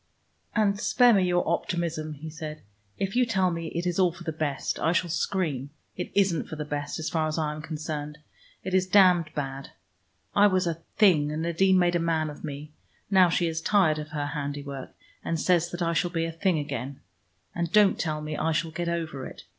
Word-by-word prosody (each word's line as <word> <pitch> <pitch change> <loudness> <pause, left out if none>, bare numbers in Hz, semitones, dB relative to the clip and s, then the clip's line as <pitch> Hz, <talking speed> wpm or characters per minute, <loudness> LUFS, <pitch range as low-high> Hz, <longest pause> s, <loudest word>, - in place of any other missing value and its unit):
"And 205 -2 +2
spare 245 +2 +5
me 195 -3 +4
your 175 0 +1
optimism," 165 -2 -2
he 155 +3 -8
said. 155 -1 -7 0.3
"If 195 +2 -2
you 250 - +4
tell 190 -6 +1
me 165 -1 -4
it 170 +2 -3
is 175 +1 -1
all 180 -2 +4
for 175 +1 -12
the 165 - -2
best, 150 -3 -2
I 165 - +2
shall 175 -1 0
scream. 155 -7 -1 0.3
It 180 - -5
isn't 190 -4 +2
for - - -5
the 150 -1 -4
best, 145 -1 -4
as 160 - -4
far 160 -2 0
as 155 - -3
I 155 -2 0
am 155 - -7
concerned. 150 -1 -5 0.5
It 190 - -4
is 185 0 +3
damned 180 -4 +5
bad. 135 -1 -5 0.6
I 205 +1 +7
was 185 -2 +1
a 165 -1 -2 0.2
Thing, 160 -9 +4
and 155 +1 -3
Nadine 185 +3 +3
made 175 -1 +3
a - - +3
man 160 -2 0
of 145 - -12
me. 150 0 -6 0.4
Now 185 -2 +6
she 175 +1 +1
is 160 -1 -2
tired 170 -6 +3
of 150 0 -6
her 145 -1 -3
handiwork, 140 -2 -5 0.3
and 165 - -2
says 175 0 +2
that 175 0 -3
I 170 0 +1
shall 170 +2 +1
be 165 -1 -1
a 165 - -3
Thing 170 +1 +1
again. 140 -2 -4 0.5
And 170 -1 -2
don't 205 -1 +5
tell 155 -2 -2
me 150 0 -4
I 160 +2 0
shall 160 0 -1
get 170 +2 -3
over 160 -6 -3
it. - - -12
165 Hz, 220 wpm, -27 LUFS, 150-180 Hz, 0.6 s, I